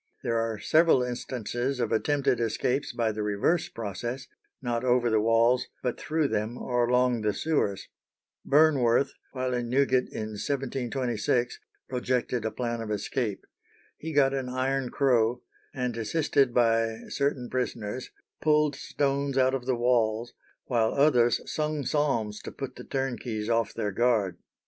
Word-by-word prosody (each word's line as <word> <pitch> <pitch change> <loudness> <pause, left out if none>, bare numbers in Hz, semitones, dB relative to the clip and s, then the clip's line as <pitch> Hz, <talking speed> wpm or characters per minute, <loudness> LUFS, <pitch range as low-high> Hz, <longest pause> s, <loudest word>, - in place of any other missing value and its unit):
There 115 -1 +1
are 115 -1 -1
several 155 +2 +4
instances 125 +1 -3
of 120 -3 -1
attempted 135 +1 +1
escapes 120 +4 0
by 115 -3 0
the 105 0 -4
reverse 105 +11 +1
process, 120 +4 -5 0.3
not 120 -2 -2
over 120 -2 +2
the 110 -1 +3
walls, 115 +3 +3 0.2
but 125 -2 -2
through 155 -2 0
them 110 +2 -2
or 120 -2 0
along 125 -1 +2
the 105 -1 0
sewers. 145 -11 -1 0.6
Burnworth, 140 -4 +4 0.2
while 130 -1 -2
in 120 -1 -2
Newgate 130 0 +2
in 110 -1 -5
1726, 125 0 -1 0.3
projected 125 -2 -1
a - - +1
plan 115 +1 -3
of 110 - -5
escape. 105 0 -2 0.5
He 160 - -6
got 140 -2 +3
an 135 -2 -2
iron 130 0 -1
crow, 120 -4 +2 0.3
and 125 -3 -2
assisted 135 +3 +1
by 115 -1 +2
certain 140 -3 -1
prisoners, 125 -2 -3 0.3
pulled 150 -2 +3
stones 140 -1 -1
out 130 0 +4
of 130 -2 -3
the 130 - +2
walls, 120 -1 +1 0.3
while 115 -3 +1
others 125 -5 +4
sung 150 -2 -2
psalms 120 -8 0
to - - -7
put 135 -2 -6
the - - -9
turnkeys 120 -5 -3
off 115 -2 +1
their 105 -3 -1
guard. 110 -3 +1
125 Hz, 145 wpm, -27 LUFS, 115-135 Hz, 0.6 s, several